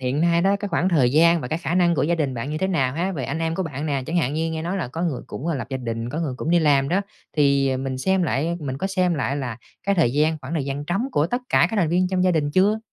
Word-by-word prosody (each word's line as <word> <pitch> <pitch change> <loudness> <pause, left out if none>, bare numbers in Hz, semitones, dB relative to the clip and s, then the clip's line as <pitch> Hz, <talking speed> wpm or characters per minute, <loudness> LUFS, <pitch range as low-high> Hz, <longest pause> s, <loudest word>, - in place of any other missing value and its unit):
hiện 130 +3 -1
nay 170 0 +3
đó, 195 +1 +3
cái 205 0 -5
khoảng 175 +1 +1
thời 140 -9 +3
gian 170 +2 +5
và 125 - -5
cái 160 - -1
khả 170 - -2
năng 175 -2 +3
của - - 0
gia 170 +4 +2
đình 145 -6 -1
bạn 120 +5 -4
như 155 - -2
thế 190 - 0
nào 135 -9 0
ha, 180 +5 -1
ề 130 - -3
anh 140 +4 -3
em 165 0 -1
của 190 - -1
bạn 150 -2 -4
nè? 140 -3 -1
Chẳng 170 - -2
hạn 145 -5 +1
như 160 +1 -1
nghe 160 0 -3
nói 175 +4 -2
là 170 -9 -3
có 165 +7 -5
người 160 -7 -2
cũng, 150 - -6
ơ, 165 - 0
lập 130 - -4
gia 135 - -1
đình, 115 -2 -4
có 155 - -3
người 145 -6 -2
cũng 155 - -3
đi 175 - +5
làm 140 -3 +3
đó, 185 +5 +2 0.4
thì 140 -2 +3
mình 130 0 -3
xem 190 +5 +1
lại 165 +3 0
mình 135 -2 -4
có 190 - -1
xem 185 -2 +1
lại 140 -1 -1
là 125 -5 -4 0.3
cái 200 - +1
thời 160 -10 +2
gian 155 +2 +2
khoảng 135 +4 -7
thời 150 - -1
gian 140 +1 -4
trống 195 +8 -1
của 145 - +2
tất 245 +6 -2
cả 170 - +4
các 225 - -3
thành 180 -6 +2
viên 180 +2 +2
trong 185 -1 +1
gia 185 - +4
đình 150 -4 0
chưa? 200 +6 +3
160 Hz, 325 wpm, -23 LUFS, 135-175 Hz, 0.4 s, gian